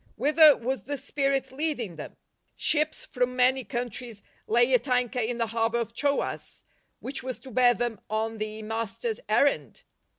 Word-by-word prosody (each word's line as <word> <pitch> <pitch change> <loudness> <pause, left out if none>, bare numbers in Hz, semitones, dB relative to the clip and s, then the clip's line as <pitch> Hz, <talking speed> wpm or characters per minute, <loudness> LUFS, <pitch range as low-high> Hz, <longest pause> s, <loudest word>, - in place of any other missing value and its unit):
■Whither 300 +3 +6
was 260 +3 -3
the 285 +1 -3
spirit 275 0 -1
leading 265 - -2
them? 155 - -9 0.4
Ships 310 0 0
from 250 0 -1
many 255 +1 +3
countries 240 -3 -4 0.2
lay 240 +3 +3
at 250 +2 +3
anchor 250 0 +1
in 235 +1 -1
the 230 - +1
harbour 230 0 +1
of 230 -1 -3
Troas 285 +3 -2 0.2
— - - -40
^which 270 0 -3
was 255 -1 -4
to 265 - -12
bear 245 0 +4
them 235 -3 -3
on 220 +1 -2
the 215 0 -4
Master's 225 - -3
errand - - +1
245 Hz, 165 wpm, -27 LUFS, 230-270 Hz, 0.4 s, ■Whither